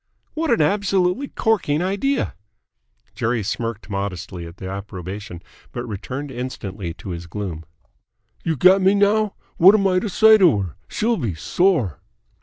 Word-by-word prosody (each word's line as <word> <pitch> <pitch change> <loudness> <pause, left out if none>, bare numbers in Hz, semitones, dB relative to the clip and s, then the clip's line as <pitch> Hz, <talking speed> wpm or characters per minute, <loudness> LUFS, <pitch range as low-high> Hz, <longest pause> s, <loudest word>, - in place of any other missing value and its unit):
"What 320 0 -2
an 235 - +3
absolutely 195 +4 +1
corking 180 - 0
idea!" 200 +9 0 0.8
Jerry 115 0 -1
smirked 115 +1 -4
modestly 95 -3 -4
at 85 +2 -12
the 95 - -7
approbation, 95 -1 -7 0.3
but 120 0 -5
returned 130 +6 -6
instantly 105 -8 -5
to 90 +3 -9
his 85 -1 -6
gloom. 85 -3 -5 0.8
"You 165 - 0
get 185 +6 +5
me 190 +2 +4
now? 205 +1 +2 0.2
What 190 +5 +8
am 200 -2 +2
I 185 -1 +3
to 210 - -3
say 220 +3 +6
to 170 - +5
her? 90 -7 -6
She'll 230 +1 0
be 110 - -2
sore!" 130 - +1
130 Hz, 150 wpm, -21 LUFS, -, 0.8 s, What